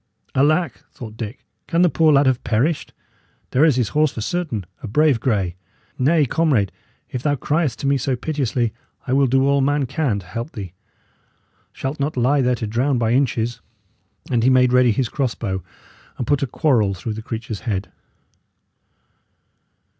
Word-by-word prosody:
"Alack!" 155 +1 +1
thought 110 -3 -9
Dick, 110 +2 -7 0.2
"can 170 +2 +2
the - - +6
poor 160 -1 +3
lad 140 0 +5
have 130 -2 +1
perished? 125 +8 0 0.6
There 130 - +3
is 155 -5 +5
his 120 -5 0
horse, 150 +4 +2
for 110 - -6
certain 125 - -2 0.2
a 125 - -6
brave 145 +3 +3
grey! 100 -8 0 0.4
Nay, 150 +4 +3
comrade, 135 - +1 0.4
if 125 - -3
thou 145 +1 +1
criest 150 0 0
to - - -4
me 140 0 +3
so 135 0 -1
piteously, 125 -5 -1 0.3
I 130 - -1
will 135 0 +4
do 135 +2 +3
all 140 0 +3
man 145 +1 +1
can 130 -5 -1
to 95 - -8
help 115 - -6
thee. 95 -4 -7 1.0
Shalt 135 +3 -5
not 140 0 -2
lie 135 +4 +3
there 125 -1 +2
to 115 - -4
drown 125 +5 0
by 115 -1 +1
inches!" 120 -3 0 0.7
And 120 -2 +2
he 125 - +4
made 125 -1 +4
ready 125 -1 +5
his 120 +3 0
crossbow, 115 -9 -2 0.6
and 125 - -3
put 145 +2 +1
a 140 - 0
quarrel 115 -8 +1
through 110 +5 -4
the 110 - -6
creature's 110 -1 -5
head. 95 -4 -3
130 Hz, 175 wpm, -21 LUFS, 115-145 Hz, 1.0 s, the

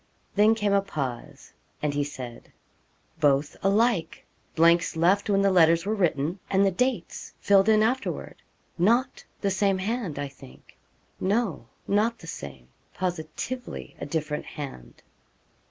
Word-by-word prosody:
Then 210 +2 +5
came 205 -2 0
a 200 - +4
pause, 135 -11 -6 0.3
and 150 -1 -1
he 145 0 0
said 130 -4 -8 0.7
'Both 145 -1 +2
alike! 205 -2 +1 0.3
blanks 170 +1 +4
left 190 +6 +2
when 200 -1 +3
the 195 - +4
letters 165 -1 +5
were 210 - 0
written, 170 -3 0
and 195 +1 +3
the 195 - +3
dates 250 +1 -2
filled 200 +1 +4
in 215 0 +5
afterward 255 +4 -2 0.4
not 235 +9 +2 0.2
the 200 - +1
same 195 0 +2
hand 200 -4 -3
I 145 0 -2
think 65 - -16 0.4
no, 195 - 0 0.2
not 220 +3 +2
the 165 - -13
same 65 - -8 0.3
positively 180 +8 -5
a - - -5
different 150 -1 -3
hand.' 100 - -9
185 Hz, 140 wpm, -26 LUFS, 150-205 Hz, 0.7 s, Then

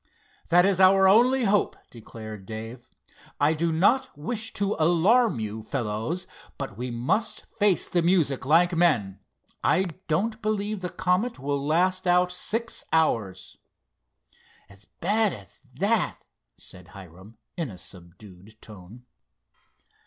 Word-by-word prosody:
"That 175 +2 +5
is 195 -2 +1
our 190 0 +6
only 245 +6 +4
hope," 205 -1 +1
declared 110 -3 -10
Dave. 115 +2 -8 0.5
"I 145 +2 +3
do 165 +1 -1
not 185 - +1
wish 220 +9 -4
to 200 +1 -1
alarm 175 - +3
you, 110 0 -5
fellows; 115 +8 -3 0.3
but - - -6
we 125 +4 -5
must 125 - -2
face 205 -3 +2
the 175 - +1
music 165 -6 +1
like 170 +6 +3
men. 120 - +1 0.4
I 190 - +3 0.2
don't 215 +8 -1
believe 215 -1 -2
the 180 - -3
Comet 185 +7 -1
will 140 +1 -3
last 185 +5 +1
out 180 0 +3
six 225 +5 -3
hours." 115 - 0 1.1
"As 100 +1 -17
bad 215 - 0
as 100 -2 -13 0.2
that?" 200 - 0 0.4
said 90 -1 -13
Hiram, 95 +4 -14 0.2
in 165 -6 -3
a 95 - -10
subdued 95 +4 -15
tone. 105 +4 -14
165 Hz, 130 wpm, -25 LUFS, -, 1.1 s, our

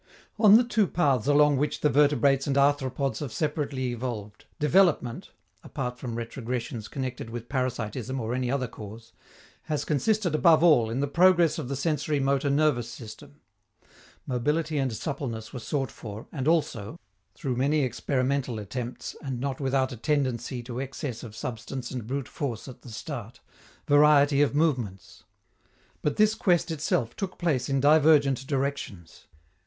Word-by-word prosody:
On 215 -1 +8
the 245 - +4
two 225 -4 +1
paths 140 -10 +1
along 145 -1 +5
which 150 +3 -1
the - - +4
vertebrates 140 -1 +3
and 140 - 0
arthropods 140 -3 +1
have 145 -5 -5
separately 145 -4 -2
evolved, 115 -4 -6
development 150 -6 +2 0.3
(apart 125 0 -5
from 120 -3 -5
retrogressions 115 -1 -4
connected 130 -4 -5
with 120 0 -7
parasitism 130 -1 -3
or 115 0 -3
any 125 -1 -1
other 130 -1 0
cause) 110 +1 -11 0.5
has 150 -1 -2
consisted 190 +4 +1
above 160 0 +5
all 145 -10 +5
in 120 +4 -2
the 145 - 0
progress 170 +1 +4
of 145 - -4
the 140 - -3
sensori 150 0 0
motor 140 +1 +1
nervous 140 -5 +2
system. 110 -3 -11 0.8
Mobility 150 +5 0
and 135 -2 0
suppleness 115 -3 -5
were 130 - -5
sought 135 +2 -2
for, 105 -1 -9
and 140 -3 -3
also 155 -5 0 0.4
through 135 -6 -3
many 140 +4 +2
experimental 130 0 -1
attempts, 120 +4 -6
and 130 -3 -4
not 135 0 -3
without 135 -1 0
a 125 - -7
tendency 130 -2 -1
to 120 0 -6
excess 135 -2 -5
of 110 -3 -9
substance 120 +2 -5
and 125 -4 -5
brute 135 0 -3
force 120 -6 -4
at 130 - -11
the - - -12
start 120 0 -7 0.5
variety 145 -1 +5
of 145 -1 +2
movements. 120 - -1 0.8
But 150 - 0
this 215 0 +4
quest 180 -7 +1
itself 140 -6 -1
took 190 -2 -5
place 140 -8 0
in 135 0 +1
divergent 145 -2 +4
directions. 135 - -4
135 Hz, 155 wpm, -27 LUFS, 120-150 Hz, 0.8 s, On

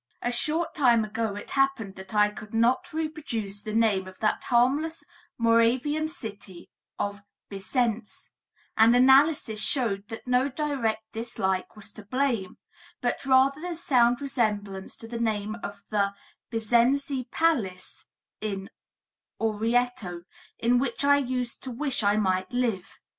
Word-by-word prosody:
A 245 - 0
short 310 +7 +1
time 240 -8 +4
ago 220 -1 -3
it 205 - -8
happened 270 -7 +1
that 190 +2 -9
I 210 0 +4
could 215 +1 -9
not 255 +10 +2
reproduce 285 -11 -4
the 215 - -5
name 215 -4 +2
of 185 - -11
that 215 - 0
harmless 275 +7 +1 0.3
Moravian 245 +7 +2
city 205 - -10 0.3
of 200 0 -3 0.3
Bisenz, 215 +2 -2 0.4
and 225 +2 +6
analysis 265 -3 +4
showed 210 -8 0
that 225 - -8
no 250 +1 +2
direct 265 -6 -1
dislike 210 -5 -2
was 210 0 -11
to 210 - -12
blame, 240 -4 -1 0.4
but - - -2
rather 270 +2 +4
the 350 0 -4
sound 245 -6 +2
resemblance 210 -8 -2
to 225 - -11
the 235 0 -5
name 215 -2 -1
of 200 0 -7
the 200 -1 +1 0.3
Bisenzi 245 +3 +1
palace 225 - -1 0.4
in 195 -2 -4 0.7
Orrieto, 225 -4 0 0.3
in 245 +1 +3
which 265 +1 -1
I 285 0 +5
used 250 -2 -3
to 265 - -6
wish 265 +2 0
I 205 0 +2
might 185 -2 0
live. 235 -7 -2
230 Hz, 135 wpm, -27 LUFS, 210-265 Hz, 0.7 s, and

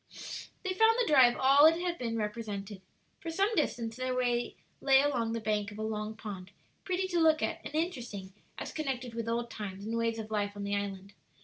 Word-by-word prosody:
They 375 -1 -1
found 445 +4 +5
the 485 - +3
drive 260 - +6
all 275 +3 +7
it 330 +1 +3
had 350 -1 -2
been 230 -2 -2
represented. 210 -2 -4 0.4
For 335 - -6
some 390 +7 +1
distance 235 - 0
their 255 0 -1
way 245 -1 0 0.3
lay 270 -1 +6
along 250 -5 +1
the 230 - -1
bank 210 -1 -1
of 205 - -10
a 215 - -3
long 215 0 -3
pond, 195 -4 -7 0.3
pretty 375 0 -1
to 350 -2 +1
look 315 -1 +4
at 335 0 -2
and 295 - -7
interesting 240 - -3 0.2
as - - -5
connected 260 -5 -3
with 230 0 -3
old 235 0 -1
times 200 -2 -6
and 225 +1 -2
ways 230 0 0
of 220 -1 -6
life 205 -1 0
on 205 - -5
the 200 0 -1
island. 200 -1 -4
230 Hz, 210 wpm, -31 LUFS, 210-305 Hz, 0.4 s, all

